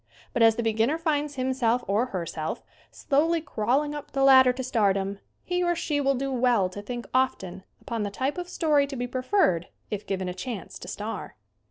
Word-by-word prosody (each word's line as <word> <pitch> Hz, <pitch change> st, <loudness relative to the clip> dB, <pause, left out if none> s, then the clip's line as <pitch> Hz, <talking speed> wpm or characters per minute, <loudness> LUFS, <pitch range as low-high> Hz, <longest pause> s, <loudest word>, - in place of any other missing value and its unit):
But 240 Hz, -, 0 dB
as 225 Hz, -1 st, +6 dB
the 235 Hz, -, -2 dB
beginner 225 Hz, +7 st, +1 dB
finds 300 Hz, -3 st, -1 dB
himself 255 Hz, -2 st, +1 dB
or 210 Hz, +6 st, +1 dB
herself 170 Hz, -6 st, -4 dB, 0.3 s
slowly 320 Hz, +4 st, +1 dB
crawling 285 Hz, +1 st, 0 dB
up 295 Hz, -1 st, -8 dB
the 275 Hz, -, +1 dB
lad 265 Hz, -1 st, +8 dB
der 250 Hz, -, +5 dB
to 260 Hz, +1 st, -5 dB
stardom 200 Hz, -5 st, +1 dB, 0.2 s
he 360 Hz, 0 st, -1 dB
or 345 Hz, 0 st, +2 dB
she 300 Hz, -3 st, -1 dB
will 275 Hz, 0 st, +2 dB
do 270 Hz, +2 st, -2 dB
well 240 Hz, -7 st, +2 dB
to 205 Hz, +2 st, -8 dB
think 240 Hz, +3 st, -6 dB
often 195 Hz, -8 st, 0 dB, 0.2 s
upon 230 Hz, -2 st, -4 dB
the 205 Hz, -, -1 dB
type 265 Hz, -, -2 dB
of 355 Hz, 0 st, -6 dB
story 300 Hz, -5 st, +2 dB
to 275 Hz, -, -6 dB
be 245 Hz, -1 st, -2 dB
preferred 250 Hz, -, +1 dB, 0.2 s
if 210 Hz, -1 st, -4 dB
given 190 Hz, -1 st, -2 dB
a 180 Hz, -, -3 dB
chance 205 Hz, +1 st, -6 dB
to -, -, -10 dB
star. 215 Hz, +2 st, -5 dB
250 Hz, 200 wpm, -26 LUFS, 210-280 Hz, 0.3 s, lad